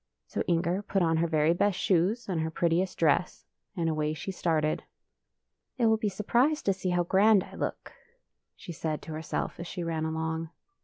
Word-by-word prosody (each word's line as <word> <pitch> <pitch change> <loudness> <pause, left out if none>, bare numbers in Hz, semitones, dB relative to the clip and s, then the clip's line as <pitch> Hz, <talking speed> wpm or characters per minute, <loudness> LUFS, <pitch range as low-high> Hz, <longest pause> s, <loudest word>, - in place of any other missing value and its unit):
So - - -3
Inger 170 +2 +1
put 195 -2 0
on 165 -1 +2
her 170 +1 +2
very 155 0 +3
best 190 +2 +1
shoes 195 +6 +1
and 175 -5 -1
her 160 - -1
prettiest 170 +3 0
dress, 165 +2 +1 0.3
and 165 -1 0
away 155 -1 0
she 150 +5 -5
started. 160 -4 0 0.5
'' - - -56
They 240 - +2
will 220 0 +4
be 215 -1 -1
surprised 240 +10 +1
to 195 - +3
see 185 0 -3
how 175 0 +2
grand 200 +3 +4
I - - -14
look," - - -4 0.6
she - - -9
said 155 -1 -3
to - - -8
herself 160 +2 -4
as 170 - -5
she 175 -1 -5
ran 160 -1 -2
along. 160 0 -2
170 Hz, 195 wpm, -29 LUFS, 160-195 Hz, 0.6 s, will